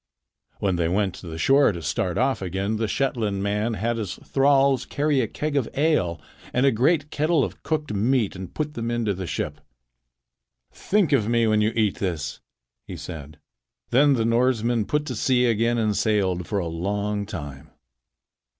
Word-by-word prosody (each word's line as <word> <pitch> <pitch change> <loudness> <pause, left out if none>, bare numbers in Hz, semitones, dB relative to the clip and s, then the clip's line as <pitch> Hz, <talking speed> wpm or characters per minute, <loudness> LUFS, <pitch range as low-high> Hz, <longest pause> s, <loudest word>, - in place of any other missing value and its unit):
When 95 -3 0
they 85 -1 +1
went 95 +1 0
to 90 - -10
the 80 -1 -6
shore 135 - +4
to 85 -3 -6
start 90 +4 -1
off 130 -1 +1
again, 95 +4 -2
the 110 0 -1
Shetland 110 -6 -1
man 105 +3 0
had 115 +4 -1
his 105 -5 -4
thralls 135 -1 +2
carry 145 -2 0
a 115 - -1
keg 150 +5 -3
of 135 -5 +1
ale 140 - +1 0.3
and 125 +2 +2
a 135 - +5
great 145 +6 +1
kettle 155 -1 +2
of - - -5
cooked 150 -6 -2
meat 110 +1 +1
and 95 -1 -7
put 150 -1 -3
them 115 -2 -3
into 120 -3 0
the 95 -1 -5
ship. - - -4 1.1
"Think 200 -5 +1
of 115 -7 +3
me 115 -1 +3
when 110 -1 +3
you 110 +1 +2
eat 110 -3 +1
this," 80 -6 -3 0.5
he - - -7
said. 75 -3 -8 0.5
Then 140 +3 +5
the 115 -2 0
Norsemen 115 -1 +2
put 150 +5 -1
to 125 - -4
sea 125 +3 +2
again 115 +1 +2
and 110 -2 +1
sailed 95 -6 0
for 105 - -1
a 95 - -1
long 100 +4 -2
time. 75 -9 -7
110 Hz, 180 wpm, -24 LUFS, 95-135 Hz, 1.1 s, a